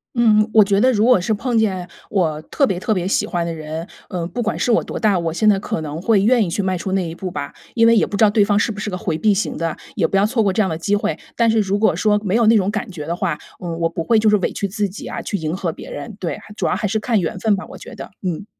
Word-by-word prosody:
嗯， 215 -3 +4
我 215 - +8
觉 195 0 +1
得 255 +4 +4
如 210 -1 +2
果 250 -5 +5
是 200 +5 0
碰 240 +3 -1
见 190 -5 0 0.2
我 165 -7 +1
特 275 - +1
别 185 -6 -1
特 215 +3 0
别 185 -3 -1
喜 195 - +1
欢 175 -2 -2
的 170 - -3
人， 160 +1 -6 0.2
呃， 175 -2 -3
不 245 - -4
管 225 - -1
是 245 - +1
我 225 - +3
多 - - -5
大， 210 -4 +3
我 165 -2 -2
现 215 +5 +3
在 205 - +4
可 165 - -3
能 155 0 -5
会 210 0 +3
愿 230 +1 +4
意 - - -4
去 200 - -1
迈 190 -1 -1
出 190 +2 -4
那 190 -2 0
一 165 - -7
步 185 +1 -5
吧。 145 -3 -5 0.2
因 230 -1 +4
为 230 - +6
也 - - +4
不 - - -5
知 210 - +3
道 215 - +7
对 205 0 +3
方 205 0 +2
是 225 - +1
不 205 - -7
是 210 - -3
个 180 - -3
回 165 -3 -2
避 210 +5 +3
型 195 - -2
的， 165 -1 -2 0.2
也 - - +1
不 - - -3
要 195 - +4
错 225 +1 +1
过 195 -2 +1
这 215 - +2
样 190 - +1
的 160 - -3
机 200 +5 0
会， 210 +1 -1 0.2
但 230 -1 +3
是 225 0 +3
如 200 -1 0
果 220 - +3
说 210 -1 +2
没 195 0 0
有 235 0 +4
那 225 +1 +6
种 195 -2 +2
感 210 -1 -3
觉 155 -5 -7
的 170 - -1
话， 175 -4 -1 0.3
嗯， 170 -2 -4
我 165 0 +1
不 165 0 -4
会 225 +5 +3
就 215 0 +3
是 210 - +4
委 190 - -1
屈 200 - -2
自 205 +1 -1
己 195 +2 -9
啊， - - -5
去 - - -3
迎 160 -1 -3
合 175 -3 -2
别 - - -10
人。 145 +7 -7
对， 175 - -3 0.2
主 - - -1
要 - - +1
还 210 - -1
是 220 +2 0
看 225 0 +1
缘 175 0 -2
分 215 +1 +2
吧， 195 - -6
我 - - -11
觉 - - -11
得， - - -9
嗯。 185 0 -3
200 Hz, 350 characters per minute, -20 LUFS, 175-215 Hz, 0.3 s, 我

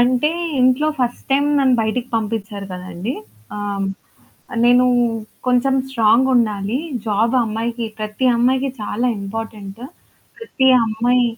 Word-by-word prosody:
అంటే 250 +5 +3 0.3
ఇంట్లో 255 +4 +3
first 245 -1 -2
time 280 +2 +3
నన్ను 265 -2 +4
బయటకి 235 +3 -2
పంపించారు 210 -2 -4
కదండీ! 180 +6 -5 0.4
ఆహ్, 200 -1 -2 0.8
నేనూ 245 +1 +5 0.6
కొంచెం 250 +2 +2 0.2
స్ట్రాంగుండాలి. 230 -2 +2 0.3
జాబ్ 220 +4 +1
అమ్మాయికి, 230 +1 -3
ప్రతి 215 +4 -2
అమ్మాయికి 260 +3 +2
చాలా 215 +3 -1
ఇంపార్టెంటు. 210 +1 -6 0.5
ప్రతి 365 -12 -1 0.2
అమ్మాయి 240 +3 +2
235 Hz, 105 wpm, -19 LUFS, 210-255 Hz, 0.8 s, నేనూ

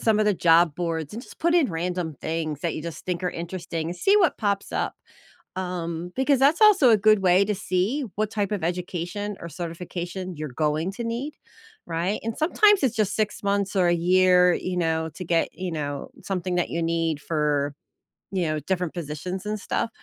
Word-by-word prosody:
some 220 -2 +3
of 215 - +3
the 210 -2 +3
job 165 -2 +4
boards, 165 -3 -3
and 230 +3 -6
just - - -14
put 340 +1 +2
in 310 - +3
random 170 -1 -2
things 160 -3 -3
that 170 0 -1
you - - -5
just 170 -1 -7
think 180 -1 -2
are 180 - 0
interesting. 170 -1 -4
See 390 - +3
what 365 -6 +3
pops 200 -2 -1
up. - - -1 0.6
Um, 175 -2 -4
because 265 +1 +3
that's 285 - +4
also 390 - +7
a 220 - +7
good 215 0 +4
way 185 +1 +5
to 210 +1 -1
see, 205 +9 0
what 215 0 -1
type 205 -2 -1
of 200 -5 -2
education 180 +3 -3
or 170 - -6
certification 175 +2 -5
you're 150 -1 -5
going 155 +6 0
to 235 - -5
need. 245 +6 -3 0.5
Right? 170 +5 -1
And 225 0 -3
sometimes, 405 +5 +4
it's 240 -3 +1
just 210 -2 +1
6 215 -1 -1
months 200 0 0
or 180 -2 +4
a 175 - +4
year, 180 +1 +4
you 185 0 -3
know, 160 -1 0
to 185 - -5
get, 170 -1 +1
you 185 -1 -5
know, 145 -3 -4
something 185 -2 -2
that 175 - 0
you 170 - -1
need 165 -2 0
for 145 -3 0 0.6
you 185 -3 0
know, 155 -1 -1
different 180 +2 -2
positions 175 +4 -5
and 215 0 -2
stuff. 220 - -2
180 Hz, 200 wpm, -25 LUFS, 165-210 Hz, 0.6 s, also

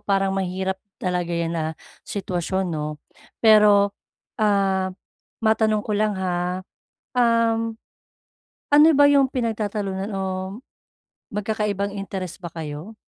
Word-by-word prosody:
parang 195 -1 +1
mahirap 190 0 -2 0.2
talaga 180 -2 -2
yan 170 -1 -1
na 165 -2 -1 0.4
sitwasyon, 190 -1 -2
'no? 150 -1 -3 0.5
Pero, 210 -2 +6 0.5
ah, 195 -3 +2 0.6
matanong 220 -1 +2
ko 215 - -2
lang 210 0 +1
ha, 180 0 -2 0.5
um, 230 -1 +2 1.0
ano 295 +1 +7
ba 285 - +7
yung 280 -1 +5
pinagtatalunan 210 -5 -2
o 195 - -2 1.1
magkakaibang 210 -1 -1
interest 190 -3 -5
ba 170 - -5
kayo? 160 +5 -6
195 Hz, 105 wpm, -23 LUFS, 185-215 Hz, 1.1 s, ano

